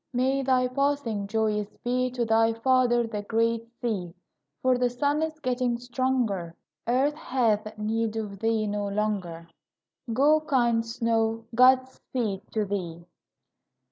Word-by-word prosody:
May 260 Hz, +2 st, +1 dB
thy 255 Hz, -1 st, +2 dB
passing 255 Hz, -6 st, -1 dB
joyous 210 Hz, -1 st, -1 dB
be 255 Hz, +1 st, 0 dB
To 245 Hz, -1 st, -2 dB
thy 225 Hz, 0 st, +3 dB
father, 240 Hz, 0 st, +2 dB
the 215 Hz, -2 st, -4 dB
great 230 Hz, +2 st, 0 dB
sea, 190 Hz, -8 st, -3 dB, 0.5 s
For 255 Hz, 0 st, +4 dB
the 250 Hz, 0 st, +2 dB
sun 285 Hz, +5 st, 0 dB
is 315 Hz, -1 st, -3 dB
getting 250 Hz, -3 st, 0 dB
stronger; 240 Hz, -8 st, -1 dB, 0.3 s
Earth 265 Hz, +5 st, +2 dB
hath 225 Hz, -8 st, -1 dB
need 220 Hz, +1 st, -1 dB
of 210 Hz, -3 st, -5 dB
thee 225 Hz, 0 st, +1 dB
no 205 Hz, -1 st, -2 dB
longer; 200 Hz, -5 st, -2 dB, 0.6 s
Go, 290 Hz, +6 st, +4 dB
kind 240 Hz, -6 st, +2 dB
snow, 225 Hz, 0 st, -1 dB
God 255 Hz, +2 st, +5 dB
speed 225 Hz, -6 st, -4 dB
to 215 Hz, -1 st, 0 dB
thee! 175 Hz, -4 st, -4 dB
230 Hz, 135 wpm, -26 LUFS, 215-255 Hz, 0.6 s, God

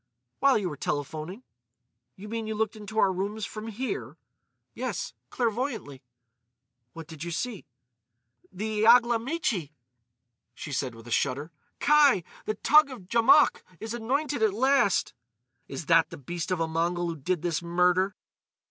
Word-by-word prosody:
"While 275 Hz, -1 st, +5 dB
you 200 Hz, -4 st, -1 dB
were 150 Hz, -4 st, -6 dB
telephoning." 155 Hz, -, -4 dB, 0.7 s
"You 200 Hz, +3 st, -10 dB
mean 225 Hz, 0 st, -4 dB
you 220 Hz, -, -3 dB
looked 220 Hz, 0 st, -1 dB
into 215 Hz, 0 st, -9 dB
our 195 Hz, -3 st, +4 dB
rooms 200 Hz, +3 st, -3 dB
from 215 Hz, +1 st, -7 dB
here?" 260 Hz, -, -4 dB, 0.6 s
"Yes, -, -, -4 dB, 0.2 s
clairvoyantly." 225 Hz, -, -2 dB, 0.9 s
"What 165 Hz, -1 st, -8 dB
did 160 Hz, -1 st, -9 dB
you 170 Hz, -, -4 dB
see?" 210 Hz, +4 st, -4 dB, 0.8 s
"The 215 Hz, +3 st, -1 dB
Iaglamichi!" 235 Hz, -, +3 dB, 0.8 s
she 145 Hz, -, -7 dB
said 130 Hz, -3 st, -2 dB
with 115 Hz, 0 st, -13 dB
a -, -, -9 dB
shudder. 140 Hz, +6 st, 0 dB, 0.3 s
"Kai! 290 Hz, -, +5 dB, 0.2 s
The 215 Hz, -, -1 dB
Toug 300 Hz, +6 st, +5 dB
of 195 Hz, -9 st, -11 dB
Djamouk 265 Hz, +7 st, +5 dB, 0.2 s
is 220 Hz, +1 st, -5 dB
anointed 265 Hz, +4 st, -1 dB
at 215 Hz, -3 st, +2 dB
last!" 260 Hz, -4 st, +2 dB, 0.5 s
"Is 140 Hz, +4 st, -6 dB
that 165 Hz, +1 st, +4 dB
the -, -, -9 dB
beast 170 Hz, +6 st, -5 dB
of 185 Hz, -2 st, 0 dB
a 165 Hz, -, 0 dB
Mongol 170 Hz, +2 st, -1 dB
who 165 Hz, -, -3 dB
did 170 Hz, +3 st, -2 dB
this 170 Hz, -2 st, -1 dB
murder?" 180 Hz, +3 st, +2 dB
200 Hz, 150 wpm, -27 LUFS, 165-235 Hz, 0.9 s, While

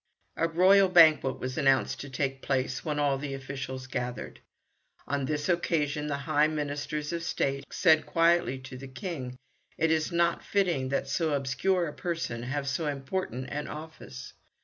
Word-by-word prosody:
A 165 Hz, -, +1 dB
royal 185 Hz, +3 st, +5 dB
banquet 155 Hz, -7 st, +6 dB
was 130 Hz, +4 st, -3 dB
announced 135 Hz, -2 st, +2 dB
to 140 Hz, -, -7 dB
take 135 Hz, 0 st, -2 dB
place, 130 Hz, -1 st, -1 dB
when 150 Hz, -3 st, -2 dB
all 140 Hz, -2 st, +1 dB
the 140 Hz, -1 st, -4 dB
officials 135 Hz, -1 st, -6 dB
gathered. 125 Hz, -2 st, -5 dB, 0.7 s
On 140 Hz, 0 st, -1 dB
this 150 Hz, +1 st, -2 dB
occasion 150 Hz, -4 st, 0 dB
the 145 Hz, -1 st, -1 dB
high 150 Hz, +2 st, +3 dB
Ministers 150 Hz, 0 st, -3 dB
of 170 Hz, -, -2 dB
State 140 Hz, -4 st, -1 dB
said 160 Hz, -3 st, +3 dB
quietly 170 Hz, -4 st, +3 dB
to 130 Hz, 0 st, -9 dB
the 135 Hz, -, -8 dB
King, 130 Hz, -2 st, -6 dB, 0.4 s
"It 160 Hz, 0 st, +2 dB
is 160 Hz, +2 st, +1 dB
not 170 Hz, 0 st, +1 dB
fitting 175 Hz, -10 st, 0 dB
that 135 Hz, 0 st, -1 dB
so 155 Hz, +2 st, 0 dB
obscure 170 Hz, +7 st, +1 dB
a 150 Hz, -, -6 dB
person 165 Hz, -9 st, -3 dB
have 140 Hz, +3 st, -3 dB
so 150 Hz, +4 st, -1 dB
important 135 Hz, -2 st, -3 dB
an 150 Hz, 0 st, -3 dB
office. 150 Hz, -5 st, -9 dB
145 Hz, 165 wpm, -29 LUFS, 135-165 Hz, 0.7 s, banquet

